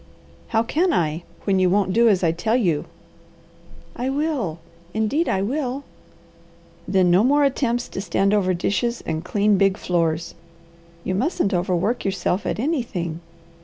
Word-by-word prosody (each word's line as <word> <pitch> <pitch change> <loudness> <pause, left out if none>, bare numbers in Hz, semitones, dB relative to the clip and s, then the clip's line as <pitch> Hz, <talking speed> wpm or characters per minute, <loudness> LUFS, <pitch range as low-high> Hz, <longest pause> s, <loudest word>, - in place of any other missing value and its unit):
"How 225 0 +1
can 340 +10 +1
I, 160 - 0 0.2
when 195 -2 +2
you 185 -1 +3
won't 190 0 +1
do 235 +1 +5
as 190 -3 +2
I 165 - +3
tell 215 +8 0
you?" 175 -12 +1 1.1
"I 250 +2 -2
will! 275 - -1 0.4
Indeed 220 +10 +1
I 190 0 +1
will!" 265 +3 -2 1.0
"Then 185 -2 +3
no 185 +4 +5
more 285 +4 +4
attempts 250 -3 0
to - - -5
stand 195 +2 +1
over 185 -3 +2
dishes 235 +7 -1
and 160 0 -3
clean 205 +1 +2
big 195 0 +3
floors. 165 -2 -1 0.7
You 185 - -2
mustn't 205 - 0
overwork 185 +6 0
yourself 195 0 -1
at - - -1
anything. 220 - -2
200 Hz, 150 wpm, -22 LUFS, 180-245 Hz, 1.1 s, do